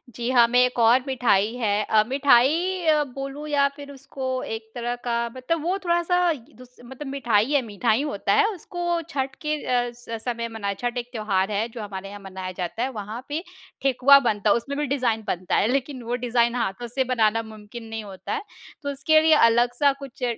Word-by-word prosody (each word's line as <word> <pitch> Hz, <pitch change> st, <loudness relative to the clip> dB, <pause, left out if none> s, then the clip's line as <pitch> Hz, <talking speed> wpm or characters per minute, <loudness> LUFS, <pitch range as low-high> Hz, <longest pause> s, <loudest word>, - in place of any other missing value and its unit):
जी 240 Hz, +1 st, -3 dB
हाँ, 240 Hz, -2 st, +6 dB
मैं 245 Hz, +1 st, +3 dB
एक 250 Hz, -1 st, -3 dB
और 235 Hz, +3 st, +5 dB
मिठाई 225 Hz, -4 st, +2 dB
है। 210 Hz, -3 st, 0 dB
अ, 215 Hz, 0 st, +3 dB
मिठाई 285 Hz, +7 st, +3 dB
अ, 305 Hz, -1 st, +4 dB
बोलूँ 275 Hz, +2 st, -7 dB
या 285 Hz, -1 st, +3 dB
फिर 285 Hz, -1 st, -10 dB
उसको 260 Hz, -1 st, -4 dB
एक 220 Hz, 0 st, -6 dB
तरह 240 Hz, 0 st, -2 dB
का 240 Hz, -1 st, -1 dB, 0.2 s
मतलब 300 Hz, +5 st, -2 dB
वो 365 Hz, +3 st, 0 dB
थोड़ा-सा 350 Hz, 0 st, +2 dB
य 305 Hz, -, -2 dB, 0.2 s
दुस 250 Hz, 0 st, -16 dB
मतलब 265 Hz, +3 st, -8 dB
मिठाई 245 Hz, -3 st, +1 dB
है, 285 Hz, -2 st, +3 dB
मीठा 225 Hz, 0 st, -3 dB
ही 230 Hz, +6 st, +2 dB
होता 295 Hz, 0 st, -1 dB
है। 430 Hz, 0 st, +5 dB
उसको 345 Hz, -1 st, -3 dB
छठ 270 Hz, -2 st, -3 dB
के 305 Hz, 0 st, +1 dB
अ, 245 Hz, -1 st, +1 dB
स 235 Hz, -2 st, -8 dB
समय 235 Hz, 0 st, -4 dB
मना 200 Hz, -3 st, -3 dB
छठ 245 Hz, +4 st, -4 dB
एक 240 Hz, 0 st, -4 dB
त्योहार 210 Hz, -3 st, 0 dB
है 210 Hz, +3 st, 0 dB
जो 230 Hz, -1 st, -8 dB
हमारे 195 Hz, -1 st, -6 dB
यहाँ 205 Hz, 0 st, -9 dB
मनाया 190 Hz, -1 st, -6 dB
जाता 185 Hz, +6 st, -3 dB
है। 265 Hz, -, -1 dB
वहाँ 220 Hz, +2 st, -6 dB
पे 315 Hz, +4 st, -3 dB, 0.4 s
ठेकुआ 275 Hz, +1 st, +6 dB
बनता 210 Hz, 0 st, 0 dB
है। -, -, +5 dB
उसमें 280 Hz, +4 st, -3 dB
भी 295 Hz, -, 0 dB
डिज़ाइन 230 Hz, -4 st, 0 dB
बनता 180 Hz, -1 st, -1 dB
है। -, -, +3 dB
लेकिन 270 Hz, 0 st, -1 dB
वो 240 Hz, +2 st, -2 dB
डिज़ाइन 235 Hz, 0 st, +2 dB
हाथों 235 Hz, 0 st, -2 dB
से 260 Hz, +3 st, 0 dB
बनाना 225 Hz, -1 st, +2 dB
मुमकिन 220 Hz, +1 st, -10 dB
नहीं 225 Hz, -1 st, -5 dB
होता 195 Hz, -, -7 dB
है। 435 Hz, -, -2 dB, 0.4 s
तो 285 Hz, -, -2 dB
उसके 310 Hz, +3 st, +3 dB
लिए 320 Hz, 0 st, +5 dB, 0.2 s
अलग-सा 245 Hz, +4 st, +3 dB
कुछ 275 Hz, -1 st, -9 dB
245 Hz, 210 wpm, -24 LUFS, 220-280 Hz, 0.4 s, हाँ